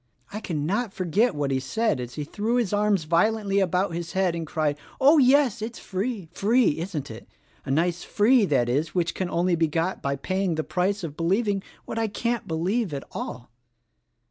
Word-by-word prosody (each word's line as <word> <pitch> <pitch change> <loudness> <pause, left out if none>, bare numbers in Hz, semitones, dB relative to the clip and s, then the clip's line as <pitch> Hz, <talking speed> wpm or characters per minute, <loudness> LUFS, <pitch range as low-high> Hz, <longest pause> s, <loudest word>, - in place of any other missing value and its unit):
I 210 - -3
cannot 195 +5 -2
forget 185 +4 +1
what 145 -2 -1
he 135 - +1
said 145 - 0
as 125 0 -6
he 150 - -3
threw 215 +10 -2
his 235 -6 0
arms 205 -3 +2
violently 200 +5 +2
about 185 -1 +1
his 170 0 -5
head 190 -2 +1
and 165 -1 -4
cried, 150 -2 0 0.2
'Oh, 290 +4 +6
yes, 260 -4 +4
it's 225 +2 -5
free, 195 -1 -3
free, 215 - +2
isn't 160 -7 -4
it! 110 - -10 0.4
A - - -7
nice 170 +5 +1
free 225 +2 +4
that 135 -8 +2
is 150 +7 -1
which 175 -2 +1
is 185 - 0
only 175 +1 +1
to - - +2
be 165 0 +2
got 165 +4 -1
by 140 0 -1
paying 185 +4 -1
the 155 - -1
price 190 +4 -1
of 150 -3 -5
believing 195 +4 +1 0.2
what 225 - -4
I 225 - +1
can't 235 +3 -2
believe 175 +3 -1
at 140 - -5
all.' 120 -2 -6
185 Hz, 195 wpm, -25 LUFS, 160-215 Hz, 0.4 s, Oh